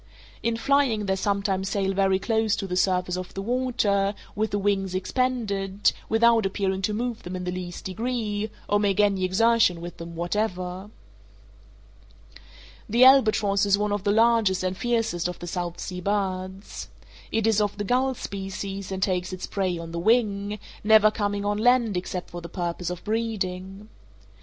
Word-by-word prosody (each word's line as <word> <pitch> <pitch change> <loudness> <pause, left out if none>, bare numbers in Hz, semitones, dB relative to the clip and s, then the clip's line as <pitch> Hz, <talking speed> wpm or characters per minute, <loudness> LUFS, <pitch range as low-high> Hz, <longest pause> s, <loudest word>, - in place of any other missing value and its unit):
In 230 -1 0
flying 260 -5 +2
they 190 -1 +1
sometimes 195 -1 -1
sail 195 -1 0
very 195 0 +2
close 220 +1 +1
to 200 - -4
the 180 -1 -3
surface 180 -1 +1
of 185 -1 -7
the 195 - -3
water, 210 -5 +1 0.2
with 215 +1 0
the 205 - -1
wings 195 -2 0
expanded, 200 -2 0 0.2
without 230 0 +4
appearing 190 0 -1
to 210 +2 0
move 235 0 -3
them 180 +1 -6
in 180 - -4
the 180 - -2
least 180 -1 -6
degree, 215 0 -2 0.2
or 205 - +2
make 205 -1 +1
any 200 -2 +3
exertion 205 -1 +3
with 175 +1 -8
them 170 0 -8
whatever. 185 +1 -2 2.0
The 235 +4 +4
albatross 215 -6 +5
is 200 0 +4
one 210 0 -1
of 205 -2 -1
the 205 - +2
largest 220 -4 +3
and 185 0 -1
fiercest 225 -7 0
of 180 - -5
the - - -8
South 175 0 -4
Sea 180 -1 -5
birds. 190 0 -3 0.4
It 225 -1 +1
is 220 -2 +3
of 205 -1 -1
the 205 - -2
gull 255 +5 +1
species, 195 -1 -5
and 190 0 -2
takes 185 -1 0
its 185 0 -5
prey 185 -3 -1
on 165 0 -7
the 170 - -3
wing, 205 0 +1 0.3
never 215 0 +6
coming 205 -1 -2
on 205 0 0
land 240 -2 +3
except 180 0 -4
for 175 - -6
the 170 - -8
purpose 175 0 -3
of 180 -1 -6
breeding. 205 -3 -3
200 Hz, 170 wpm, -25 LUFS, 185-220 Hz, 2.0 s, never